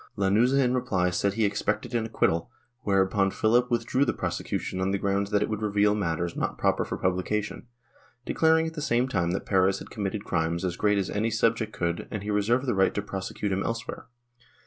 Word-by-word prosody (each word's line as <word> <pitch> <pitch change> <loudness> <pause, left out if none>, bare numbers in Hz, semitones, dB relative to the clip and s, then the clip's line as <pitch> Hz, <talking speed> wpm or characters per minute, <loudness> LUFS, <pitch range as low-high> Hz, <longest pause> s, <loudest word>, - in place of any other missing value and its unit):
Lanuza 110 +8 +3
in 125 -2 +2
reply 95 -8 +1
said 95 +2 0
he 110 -1 +2
expected 105 +4 -1
an 115 -2 0
acquittal, 85 -4 0 0.3
whereupon 95 -1 +2
Philip 120 +5 +2
withdrew 120 +3 +1
the 140 - 0
prosecution 95 - -3
on 95 - +1
the 100 - +1
grounds 100 +1 0
that 105 0 +2
it - - -1
would 110 -1 -3
reveal 105 0 +2
matters 85 -4 -2
not - - -2
proper - - +1
for - - -4
publication, 100 +5 -2 0.6
declaring 160 0 +3
at 160 - -4
the 155 - -5
same 125 -3 +1
time 95 -9 0
that 95 - -2
Perez 95 0 +3
had - - -10
committed 100 -1 -3
crimes 85 +1 -1
as 90 -2 -2
great 105 +1 +2
as 100 - -1
any 110 +3 0
subject 115 0 +1
could 85 -3 -2
and 105 -2 -5
he 105 - -3
reserved 115 +6 +1
the 125 - +1
right 95 -1 +2
to 105 - 0
prosecute 100 +1 -4
him 95 +1 0
elsewhere. 115 +2 -4
105 Hz, 205 wpm, -27 LUFS, 95-115 Hz, 0.6 s, Lanuza